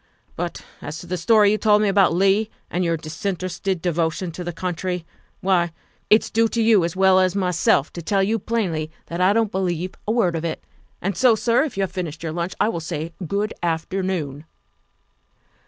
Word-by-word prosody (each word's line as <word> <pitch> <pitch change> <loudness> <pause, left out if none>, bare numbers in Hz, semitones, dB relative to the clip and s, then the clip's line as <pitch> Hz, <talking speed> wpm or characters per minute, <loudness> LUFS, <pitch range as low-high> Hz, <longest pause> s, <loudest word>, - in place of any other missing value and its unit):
But - - -5 0.2
as 145 +2 -6
to 170 - -9
the 180 +1 -3
story 205 +3 +4
you 215 - +1
told 210 -1 +4
me - - +2
about 195 -1 +4
Leigh 195 +5 +2 0.2
and 180 - 0
your 165 -1 +1
disinterested 180 +3 -3
devotion 170 0 -1
to 180 +2 -6
the 175 - -3
country, 180 0 -3 0.4
why, 175 -3 +2 0.4
it's 215 - +4
due 225 +1 +3
to 230 - -3
you 220 -4 +5
as 170 +1 -2
well 190 0 +5
as 185 0 +2
myself 180 -6 +2
to 170 - -6
tell 195 +4 +1
you 220 +3 +1
plainly 185 -9 -1 0.2
that 170 +2 -3
I 185 +2 +5
don't 220 -1 +1
believe 180 -1 -2
a - - +2
word 195 -8 +2
of 165 - -3
it. 165 -2 -3 0.4
And 195 +1 -1
so, 250 0 +5
sir, 230 +3 +2
if 285 - -7
you 195 - +1
have 190 - -2
finished 170 -4 -5
your 160 - -2
lunch, 170 +2 -3
I - - +3
will 195 -7 -2
say 165 0 -5
good 205 +5 -1
afternoon." 165 -3 -2
185 Hz, 200 wpm, -22 LUFS, 170-200 Hz, 0.4 s, you